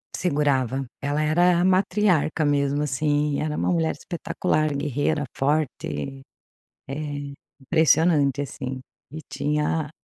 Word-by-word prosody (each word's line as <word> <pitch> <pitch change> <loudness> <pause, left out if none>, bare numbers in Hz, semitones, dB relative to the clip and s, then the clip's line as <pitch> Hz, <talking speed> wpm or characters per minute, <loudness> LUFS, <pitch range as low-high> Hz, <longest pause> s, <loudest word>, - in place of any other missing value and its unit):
Segurava, 135 -5 0 0.2
ela 145 +2 0
era 175 +3 +3
a 180 - +2
matriarca, 185 -5 +2
mesmo, 145 0 +1
assim, 145 +1 0
era 150 0 -2
uma - - 0
mulher 165 -2 +1
espetacular, 155 -3 -1
guerreira, 145 +1 -1
forte, 135 - -2 0.7
é 135 - -4 0.7
impressionante, 155 -2 +3
assim, 130 -1 -5 0.3
e 155 - -6
tinha 150 +1 -1
150 Hz, 110 wpm, -24 LUFS, 140-160 Hz, 0.7 s, era